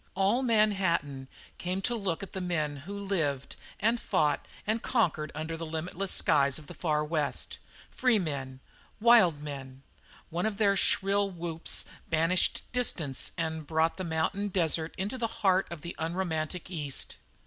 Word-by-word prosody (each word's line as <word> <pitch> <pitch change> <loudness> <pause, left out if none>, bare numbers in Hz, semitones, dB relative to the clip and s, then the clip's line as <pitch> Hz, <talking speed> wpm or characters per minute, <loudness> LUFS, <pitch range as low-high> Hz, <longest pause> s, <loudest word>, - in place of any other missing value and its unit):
All 195 +6 +3
Manhattan 190 - +2 0.3
came 180 +2 -2
to 245 - +1
look 195 -5 -2
at 195 - -8
the 190 - -3
men 155 -5 -1
who 190 +9 -7
had - - -7
lived 145 -7 0 0.2
and 225 +3 +2
fought 150 -8 +1 0.2
and 220 +2 0
conquered 160 - +1
under 160 +2 -3
the 165 - -6
limitless 170 +4 -3
skies 140 -2 +3
of 155 - -10
the - - -9
Far 150 -3 0
West, 150 -4 -1 0.3
free 250 -3 +3
men, 135 -7 -3 0.4
wild 210 -10 +6
men 135 -2 -7 0.5
one 175 +5 0
of 210 -2 -3
their 200 -2 +4
shrill 200 +1 +3
whoops 170 -2 -1 0.2
banished 165 +3 +2
distance 175 - 0
and 160 -2 -2
brought 160 +1 +2
the 185 - -3
mountain 170 +5 0
desert 165 -4 0
into 205 +7 -3
the 230 - +1
very 225 - -12
heart 190 -1 +4
of 170 -3 -7
the 170 - -6
unromantic 165 +1 -2
East. 150 -6 -3
170 Hz, 160 wpm, -30 LUFS, 155-195 Hz, 0.5 s, wild